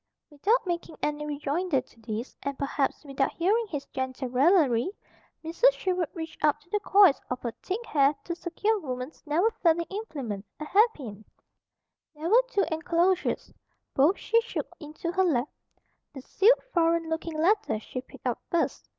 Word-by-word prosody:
Without 400 Hz, -, +1 dB
making 345 Hz, -2 st, -3 dB
any 300 Hz, 0 st, -1 dB
rejoinder 295 Hz, +2 st, 0 dB
to 245 Hz, -2 st, -14 dB
this, 225 Hz, +2 st, -5 dB
and 280 Hz, -1 st, -4 dB
perhaps 280 Hz, +1 st, -1 dB
without 275 Hz, -1 st, 0 dB
hearing 430 Hz, +7 st, +1 dB
his 290 Hz, -7 st, -5 dB
gentle 260 Hz, 0 st, -4 dB
raillery, 270 Hz, -1 st, +3 dB, 0.6 s
Mrs. 465 Hz, +10 st, +4 dB
Sherwood 365 Hz, -6 st, -1 dB
reached 320 Hz, -2 st, -7 dB
up 300 Hz, -1 st, +3 dB
to 345 Hz, -, -26 dB
the 420 Hz, -, +1 dB
coils 390 Hz, -8 st, +5 dB
of 250 Hz, -, -2 dB
her 235 Hz, -, -2 dB
thick 430 Hz, +6 st, -4 dB
hair 285 Hz, -4 st, +3 dB
to 340 Hz, -, -3 dB
secure 385 Hz, +6 st, -1 dB
woman's 255 Hz, -2 st, -6 dB
never 345 Hz, +10 st, +2 dB
failing 335 Hz, -1 st, +3 dB
implement, 275 Hz, -, -5 dB
a 305 Hz, -, -5 dB
hairpin. 300 Hz, -, +1 dB, 0.9 s
There 310 Hz, +3 st, -4 dB
were 475 Hz, +5 st, +6 dB
two 405 Hz, -5 st, +1 dB
enclosures. 340 Hz, +3 st, 0 dB, 0.4 s
Both 295 Hz, +8 st, +4 dB
she 460 Hz, -, +2 dB
shook 465 Hz, -, -5 dB
into 310 Hz, +2 st, -5 dB
her 380 Hz, +1 st, +2 dB
lap. 290 Hz, -7 st, +1 dB, 0.7 s
The 265 Hz, -, -8 dB
sealed, 435 Hz, -, +4 dB
foreign 335 Hz, -1 st, +2 dB
looking 320 Hz, 0 st, -3 dB
letter 375 Hz, -, +2 dB
she 255 Hz, +3 st, -6 dB
picked 260 Hz, -, -16 dB
up 245 Hz, -2 st, -1 dB
first. 340 Hz, -, -1 dB
320 Hz, 160 wpm, -27 LUFS, 275-375 Hz, 0.9 s, were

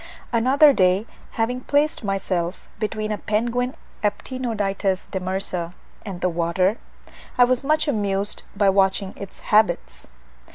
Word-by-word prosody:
Another 270 Hz, +5 st, +6 dB
day, 185 Hz, -1 st, +3 dB, 0.3 s
having 245 Hz, +3 st, -1 dB
placed 290 Hz, 0 st, +1 dB
myself 185 Hz, -3 st, -2 dB
between 215 Hz, 0 st, -2 dB
a 210 Hz, -, -2 dB
penguin 240 Hz, +5 st, -1 dB, 0.3 s
(Aptenodytes 205 Hz, -4 st, -1 dB
demersa) 185 Hz, -2 st, -2 dB, 0.3 s
and 190 Hz, -4 st, -7 dB
the 180 Hz, -, +2 dB
water, 175 Hz, +5 st, +1 dB, 0.6 s
I 250 Hz, -, +7 dB
was 250 Hz, +1 st, +2 dB
much 310 Hz, +2 st, +2 dB
amused 205 Hz, -5 st, -1 dB, 0.2 s
by 200 Hz, -1 st, +4 dB
watching 195 Hz, 0 st, +2 dB
its 200 Hz, -1 st, -9 dB
habits. 175 Hz, -, +2 dB
205 Hz, 120 wpm, -23 LUFS, 190-245 Hz, 0.6 s, I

